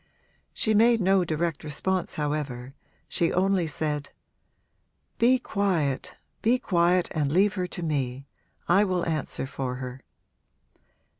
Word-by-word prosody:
She 220 - +1
made 230 +2 +5
no 190 -1 +3
direct 165 -1 -2
response 180 +5 -2
however; 145 -4 -3 0.3
she 170 - 0
only 185 -2 +2
said 150 -2 -2 1.1
'Be 250 +2 +5
quiet, 185 - -1 0.3
be 235 +3 +3
quiet 175 -4 +2
and 145 -3 0
leave 190 +4 +3
her 180 -1 -2
to 175 - -6
me. 135 -4 -2 0.4
I 195 +4 +5
will 185 -3 0
answer 155 -4 -2
for 130 -1 -4
her.' 130 0 -7
170 Hz, 125 wpm, -26 LUFS, 145-190 Hz, 1.1 s, made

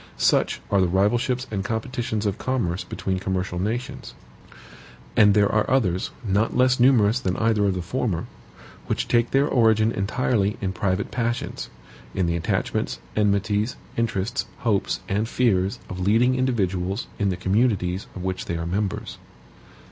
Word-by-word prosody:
Such - - +2
are 100 -1 +4
the 90 - +3
rivalships 120 +7 +1
and 100 -2 -2
competitions 110 0 -2
of 100 -1 -1
commerce 110 -9 -1
between 95 -1 -3
commercial 95 -1 -2
nations. 115 +6 -4 1.0
And 105 -1 +6
there 100 -1 +4
are 110 0 +1
others, 100 -9 +1 0.2
not 105 +4 +1
less 130 0 +4
numerous 120 -2 +5
than 95 -8 -2
either 110 -2 +2
of 95 -2 +1
the 90 - -3
former, 95 -3 -2 0.6
which - - -1
take 120 0 +2
their 140 +2 +3
origin 110 -4 +3
entirely 105 0 0
in 95 -2 -2
private 95 0 -1
passions; 120 0 -2 0.5
in 95 - +1
the 85 0 0
attachments, 85 - -1 0.2
enmities, 105 +2 +1 0.2
interests, 115 +1 -1
hopes, 110 -6 0
and 105 +4 -1
fears 100 -4 +1
of 90 - -6
leading 115 +7 +3
individuals 100 -6 0
in 100 -2 +2
the 90 - -2
communities 95 -1 +1
of 95 - -6
which 95 0 -3
they 85 - -2
are 85 - -3
members. 95 +3 -3
105 Hz, 150 wpm, -24 LUFS, 95-120 Hz, 1.0 s, And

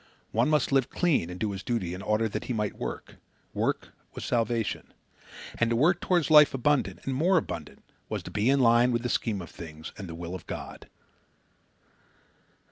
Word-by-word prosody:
One - - +2
must 150 -3 +2
live 135 -3 +3
clean 160 - +1
and 90 +1 -7
do 110 -2 -1
his 95 -1 -5
duty 110 -9 -2
in 90 - -6
order 105 +2 +1
that 105 - -4
he 125 - -2
might 105 -3 -1
work. - - -6 0.4
Work - - -1 0.3
was - - -5
salvation. 115 -2 -1 0.6
And 115 - +3
to 115 - +1
work 165 +8 +3
toward 175 -4 +2
life 150 -2 +8
abundant, 140 +1 +1
and 135 - -1
more 175 +8 +3
abundant, 80 - -4 0.3
was - - -3
to - - -8
be 105 +5 +1
in 140 0 +4
line 120 +1 +5
with 120 0 0
the 125 - -1
scheme 105 -7 -1
of - - -11
things 80 -1 -9
and 95 -3 -7
the 80 - -6
will 85 +1 -6
of 95 - -8
God. - - -7
115 Hz, 195 wpm, -28 LUFS, 100-135 Hz, 0.6 s, life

